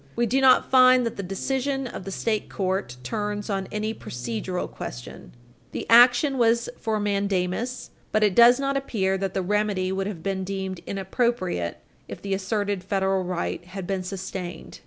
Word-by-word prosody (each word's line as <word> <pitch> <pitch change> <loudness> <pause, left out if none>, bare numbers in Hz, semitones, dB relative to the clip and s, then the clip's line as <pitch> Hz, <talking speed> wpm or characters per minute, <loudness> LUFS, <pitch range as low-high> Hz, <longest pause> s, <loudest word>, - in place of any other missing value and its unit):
We 240 - +2
do 260 +4 +1
not 260 -1 +5
find 255 -1 +6
that 230 - -3
the - - -4
decision 265 +8 -2
of 215 -6 -7
the 195 - -5
state 215 +2 -1
court 190 -9 -2
turns 205 - -3
on 195 -1 -2
any 215 +1 -2
procedural 120 - -4
question. - - -9 0.4
The - - -4
action 245 +3 +6
was 235 0 +3
for 220 -1 -1
mandamus, 200 +3 -1 0.2
but 215 - +2
it 205 -3 +3
does 240 +4 +7
not 275 0 0
appear 205 -8 0
that 195 -1 -3
the 190 - 0
remedy 200 -1 0
would 190 0 -1
have 180 -6 -6
been 190 -1 -2
deemed 190 -1 -4
inappropriate 190 - -1 0.3
if - - -8
the 195 -1 -3
asserted 200 0 -1
federal 190 -1 0
right 180 -1 -3
had 185 +1 -7
been 190 0 -2
sustained. 185 -1 -6
200 Hz, 170 wpm, -25 LUFS, 185-235 Hz, 0.4 s, does